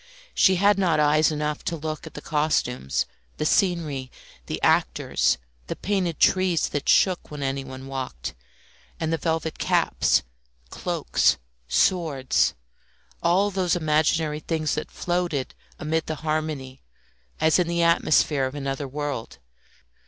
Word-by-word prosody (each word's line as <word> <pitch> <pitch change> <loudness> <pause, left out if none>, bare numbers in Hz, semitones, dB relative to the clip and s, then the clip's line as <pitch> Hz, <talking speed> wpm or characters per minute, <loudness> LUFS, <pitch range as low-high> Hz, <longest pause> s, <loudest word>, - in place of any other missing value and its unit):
She 190 - +5
had 200 +2 +4
not 170 -5 +2
eyes 150 +1 +4
enough 150 -1 -2
to 170 - -1
look 155 +1 -5
at - - -12
the - - -8
costumes, 150 - 0 0.3
the - - -1
scenery, 155 -8 +1 0.4
the - - -3
actors, 65 -1 +2 0.3
the - - -3
painted 185 -5 -1
trees 185 -3 +3
that 145 - -2
shook 185 -3 +3
when 150 -2 -6
anyone 135 -1 -4
walked, 130 - -5 0.7
and 160 0 -1
the 165 - 0
velvet 160 0 -2
caps, - - +2 0.5
cloaks, - - +1 0.3
swords 145 - +2 0.7
all 190 +4 +3
those 185 -3 +1
imaginary 155 -1 +1
things 155 -1 -1
that 155 - -3
floated 175 -6 -2 0.2
amid 160 +1 -1
the 155 - -2
harmony 155 -4 -2 0.6
as 160 +3 +4
in 175 - +2
the 170 0 +1
atmosphere 155 -4 +3
of 130 - -8
another 140 0 -3
world. 145 -3 -4
155 Hz, 130 wpm, -25 LUFS, 140-170 Hz, 0.7 s, She